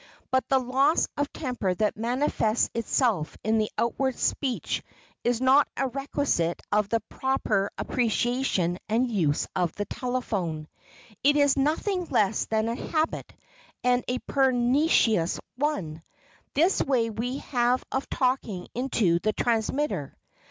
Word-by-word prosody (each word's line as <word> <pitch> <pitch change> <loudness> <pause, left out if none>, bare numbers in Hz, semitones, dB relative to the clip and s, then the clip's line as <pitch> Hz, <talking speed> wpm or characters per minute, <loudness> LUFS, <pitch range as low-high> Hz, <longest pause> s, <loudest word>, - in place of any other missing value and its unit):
But 260 0 +1
the 270 - +4
loss 265 +5 +2
of 290 0 -1
temper 245 - -2
that 210 +2 0
manifests 235 -1 0
itself 230 - 0
in 220 +1 +2
the 215 - 0
outward 260 +2 0
speech 260 -4 -1 0.4
is 240 -1 +1
not 260 +3 +5
a 270 - 0
requisite 270 - -1
of 210 -1 +2
the 230 0 +1
proper 215 -7 -1
appreciation 235 -7 0
and 235 +4 +2
use 160 -9 +1
of 180 -2 0
the 205 - -2
telephone. 200 -13 -3 0.6
It 290 +2 +5
is 285 -2 +4
nothing 335 +7 0
less 210 - +1
than 220 0 0
a 230 - -1
habit, 310 +6 -2 0.5
and 250 0 +3
a 250 - 0
pernicious 250 - +2 0.2
one,—this 280 - -2
way 240 -5 +1
we 245 +5 -3
have 245 0 +2
of 265 - -2
talking 250 -8 -1
into 230 -9 +1
the 215 +4 0
transmitter. 230 - -1
245 Hz, 130 wpm, -26 LUFS, 210-270 Hz, 0.6 s, not